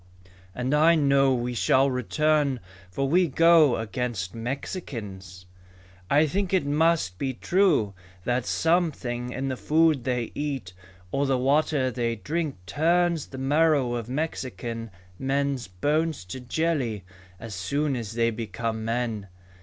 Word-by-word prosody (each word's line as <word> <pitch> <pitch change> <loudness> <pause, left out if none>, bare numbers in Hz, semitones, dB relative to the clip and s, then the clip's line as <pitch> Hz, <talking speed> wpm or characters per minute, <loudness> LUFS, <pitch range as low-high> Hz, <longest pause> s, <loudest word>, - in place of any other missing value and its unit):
"And 125 +3 -1
I 160 +3 +5
know 140 -3 +4
we 125 0 -2
shall 130 +3 +3
return 140 +2 +1 0.3
for 135 +9 -1
we 175 +5 +3
go 165 -2 +5
against 110 -3 -3
Mexicans. 115 - -6 0.6
"I 150 +2 +5
think 190 +4 0
it 180 - +1
must 150 - +1
be 130 -2 -2
true 170 - +2 0.3
that 125 +2 -1
something 140 -8 0
in 135 +2 -3
the 130 - -2
food 155 -1 +2
they 125 -2 -1
eat 135 -11 -4 0.4
or 140 +1 0
the 135 -1 +2
water 135 0 +2
they 115 0 -1
drink 150 - -3
turns 170 - +1
the 130 - -9
marrow 140 -1 +2
of 120 -1 -4
Mexican 125 -5 -4 0.3
men's 135 -1 -1
bones 150 - -1
to 90 +9 -7
jelly 125 - -1 0.4
as 115 -2 -7
soon 140 +10 -1
as 115 -3 -5
they 115 0 +2
become 115 0 -4
men. 115 -3 -2
130 Hz, 135 wpm, -26 LUFS, 115-155 Hz, 0.6 s, I